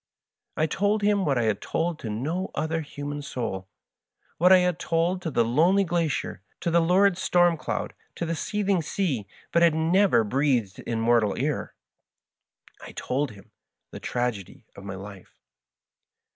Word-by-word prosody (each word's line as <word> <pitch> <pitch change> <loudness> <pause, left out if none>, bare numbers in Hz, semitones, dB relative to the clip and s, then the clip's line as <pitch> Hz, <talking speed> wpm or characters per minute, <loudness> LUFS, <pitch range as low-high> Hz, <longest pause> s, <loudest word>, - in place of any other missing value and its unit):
I 155 - +3
told 205 +6 0
him 205 -2 +2
what 140 -3 +1
I 120 - +1
had 110 -2 0
told 165 -1 -2
to 110 - -5
no 155 - -2
other 160 +1 -1
human 145 -1 -6
soul 110 -9 -4 0.3
— - - -42
what 180 +3 +5
I 190 - +9
had 180 -2 +1
told 170 +3 0
to 170 - -3
the 120 -6 +2
lone 155 +11 +3
ly 200 - +4
glacier, 170 - -1 0.2
to 170 - -1
the 170 - +4
lurid 180 +2 +3
storm 175 -2 +3
cloud, - - -4 0.2
to 170 - -3
the 165 - -2
seething 200 +2 0
sea, 150 - -2 0.2
but 170 - +3
had 170 -2 +5
never 170 - +3
breathed 120 -4 0
in 115 -1 -3
mortal 115 -3 +2
ear 145 +4 -2 0.5
— - - -30
I - - -10
told 140 +2 -2
him 100 -2 -17 0.4
the - - -8
tragedy 120 -6 -3
of 100 - -11
my 95 -1 -6
life. 100 -1 -11
155 Hz, 170 wpm, -26 LUFS, 120-175 Hz, 0.5 s, I